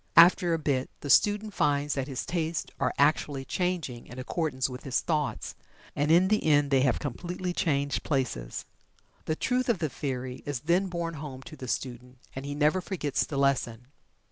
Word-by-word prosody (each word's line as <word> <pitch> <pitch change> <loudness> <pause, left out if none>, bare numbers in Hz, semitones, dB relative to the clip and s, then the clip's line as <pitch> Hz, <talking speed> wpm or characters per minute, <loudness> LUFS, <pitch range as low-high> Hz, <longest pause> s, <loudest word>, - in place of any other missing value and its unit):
After 170 0 +7
a - - 0
bit 140 -4 0
the 145 - -1
student 210 0 +4
finds 145 -2 +1
that 135 -1 -2
his 135 -3 -4
tastes 165 -2 -1
are - - +1
actually 140 -2 +2
changing 175 -10 -2
in 125 - -10
accordance 130 0 -1
with 125 -1 -7
his 135 -3 0
thoughts, 150 -4 -1 0.4
and 145 +1 +1
in 175 +4 +5
the 215 0 +2
end 145 -2 +3
they 135 -1 +5
have 130 -3 +3
completely 175 +6 -4
changed 140 -4 0
places. 125 - -2 0.6
The 155 - 0
truth 250 +7 0
of 230 - +3
the 160 -3 -1
theory 130 -2 -4
is 145 -4 -3
then 175 +5 +2
borne 170 -2 -3
home 140 -4 -7
to 155 - -10
the 130 - -8
student, 125 0 -4 0.2
and 135 +1 -5
he 145 - -3
never 150 +5 +3
forgets 165 -7 -1
the 140 - -4
lesson. 125 -3 0
145 Hz, 185 wpm, -28 LUFS, 130-170 Hz, 0.6 s, After